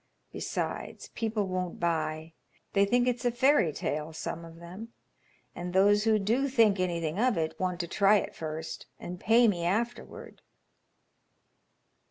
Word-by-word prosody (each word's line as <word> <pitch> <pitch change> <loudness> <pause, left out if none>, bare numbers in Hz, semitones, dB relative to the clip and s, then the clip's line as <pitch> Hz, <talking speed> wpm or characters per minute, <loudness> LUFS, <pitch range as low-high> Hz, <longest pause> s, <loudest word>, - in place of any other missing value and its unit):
Besides, - - -4
people 220 -2 -1
won't 185 -1 -3
buy. 160 -1 -1 0.4
They 200 0 +4
think 245 +4 +2
it's 245 0 0
a 245 - +3
fairy 240 - +3
tale; 150 +2 -3
some 165 +1 -5
of 165 0 -11
them, 185 +7 -10 0.6
and 175 0 -6
those 205 +3 +4
who 220 -1 +4
do 230 +7 +1
think 225 -7 +3
anything 170 -1 -1
of 245 -4 +2
it 160 -1 -2
want 180 -2 -1
to 170 - -5
try 200 +4 +4
it - - -4
first 160 0 -6
and 175 0 -7
pay 230 +4 +5
me 175 -5 0
afterward." 225 +7 -3
190 Hz, 150 wpm, -29 LUFS, 170-225 Hz, 0.6 s, pay